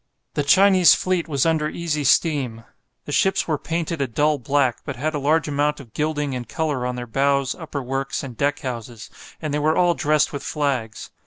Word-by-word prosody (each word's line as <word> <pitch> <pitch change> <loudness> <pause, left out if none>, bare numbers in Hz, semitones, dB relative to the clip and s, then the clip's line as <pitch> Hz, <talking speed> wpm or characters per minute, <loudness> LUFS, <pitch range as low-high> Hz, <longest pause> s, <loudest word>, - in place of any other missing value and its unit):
The - - 0
Chinese 185 +5 +6
fleet 185 -2 -1
was 140 -3 0
under 160 -2 +1
easy 155 -3 -2
steam. 135 -6 +1 0.4
The - - -6
ships 190 +6 +2
were 155 -3 0
painted 165 -1 -3
a 135 - +1
dull 145 +5 +1
black, 135 0 +1
but 140 - -5
had 155 +6 -2
a 150 - -2
large 155 +3 +2
amount 150 +1 0
of 120 -6 -13
gilding 150 -2 -1
and 125 -1 -5
colour 150 -6 -1
on 125 - -3
their 125 0 -5
bows, 140 +2 +1
upper 155 -5 -6
works, 135 +2 -3
and 130 -3 -7
deck 145 +5 0
houses, 120 -4 -6 0.3
and 155 -2 -2
they 150 - +1
were 155 +2 +1
all 175 -1 +4
dressed 150 -1 +1
with 140 - -4
flags. 130 -8 -3
145 Hz, 200 wpm, -22 LUFS, 135-155 Hz, 0.4 s, Chinese